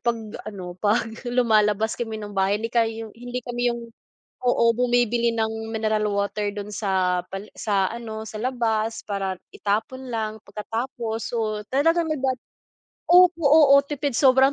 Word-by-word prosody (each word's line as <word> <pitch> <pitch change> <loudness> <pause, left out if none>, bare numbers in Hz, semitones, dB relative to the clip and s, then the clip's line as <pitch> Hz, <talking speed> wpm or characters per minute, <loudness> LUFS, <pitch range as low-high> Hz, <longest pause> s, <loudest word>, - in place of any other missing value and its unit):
'pag 235 -1 +1 0.3
ano, 185 -4 -7
'pag 215 +2 +2 0.2
lumalabas 220 -3 +2
kami 225 -2 -3
ng 205 -1 -7
bahay. 195 +1 +2
Kindi 225 +2 -4
kay 230 -2 +3 0.2
hindi 245 +1 -6
kami 245 0 -3
'yung 235 0 -4 0.6
oo, 245 -1 +3
bumibili 240 -1 +2
ng 220 0 -2
mineral 215 -1 0
water 200 +1 -1
dun 205 0 -6
sa 185 -3 +1
pali 195 +2 -7
sa 200 -3 0
ano, 220 -2 -6
sa 215 0 -7
labas 225 -3 -1
para 195 -2 -2 0.2
itapon 255 +6 -2
lang 220 -1 -3
pagkatapos. 225 +2 -4
So, 215 -2 -1
talagang 330 +5 +3
nagdadal 265 -4 0 0.7
opo, 355 -1 +6
oo, 285 -1 +7
tipid 285 -2 -2
sobrang 265 0 +5
225 Hz, 145 wpm, -24 LUFS, 210-245 Hz, 0.7 s, oo